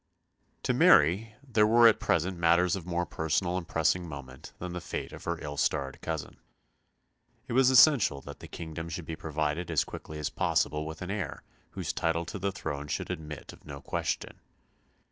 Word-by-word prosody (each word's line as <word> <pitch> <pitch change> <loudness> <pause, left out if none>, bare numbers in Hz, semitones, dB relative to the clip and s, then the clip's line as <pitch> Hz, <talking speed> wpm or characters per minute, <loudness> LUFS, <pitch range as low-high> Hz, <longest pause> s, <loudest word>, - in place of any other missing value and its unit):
To - - +1
Mary 95 +9 +5
there 110 -4 +4
were 115 +1 +7
at 115 - +4
present 85 +3 +1
matters 85 +1 +4
of 90 -3 -7
more 90 0 0
personal 85 +3 -1
and 90 -2 -3
pressing 85 +2 +1
moment 65 -3 -9
than 90 0 -6
the 90 - -4
fate - - -5
of - - -10
her - - -1
ill 75 -1 -6
starred 70 -2 -1
cousin. - - -4 1.1
It - - -4
was 130 +1 +5
essential 130 - +6
that 70 +1 -10
the - - -10
kingdom 80 0 -6
should 80 +1 -5
be 80 - -5
provided 80 +2 -2
as - - +2
quickly 75 - -8
as 75 - -3
possible 75 +1 0
with 80 +2 -7
an 90 - -4
heir 100 -8 -4 0.3
whose - - -3
title 85 0 0
to 95 - -6
the 100 +1 -1
throne 75 -7 -5
should - - -3
admit 75 -2 -7
of - - -17
no 70 -2 -8
question. 70 - -3
85 Hz, 185 wpm, -29 LUFS, 75-95 Hz, 1.1 s, were